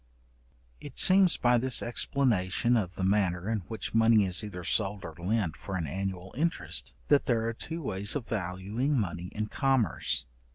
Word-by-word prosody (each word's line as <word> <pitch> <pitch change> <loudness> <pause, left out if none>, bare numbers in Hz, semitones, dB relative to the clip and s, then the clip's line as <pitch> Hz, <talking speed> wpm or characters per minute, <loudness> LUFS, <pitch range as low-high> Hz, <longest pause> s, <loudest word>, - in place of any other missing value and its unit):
It - - -11
seems 185 -2 +6
by 120 0 +3
this 130 0 0
explanation 120 -3 +1
of 95 -6 -1
the 95 - -3
manner 95 -2 +1
in 110 -1 0
which 110 -1 -4
money 115 -2 +5
is 90 +3 -2
either 90 -4 -7
sold 100 +3 +1
or 80 - -7
lent 95 -2 -1
for 95 - -6
an 85 -3 -2
annual 95 +3 -5
interest, 165 +5 -2
that 145 -1 +4
there 115 -2 +1
are 115 - -2
two 165 +8 -6
ways 100 -1 -2
of 135 -5 -3
valuing 105 +8 -2
money 90 -3 -3
in 105 +2 -4
commerce. 130 - 0
105 Hz, 170 wpm, -29 LUFS, 95-120 Hz, -, seems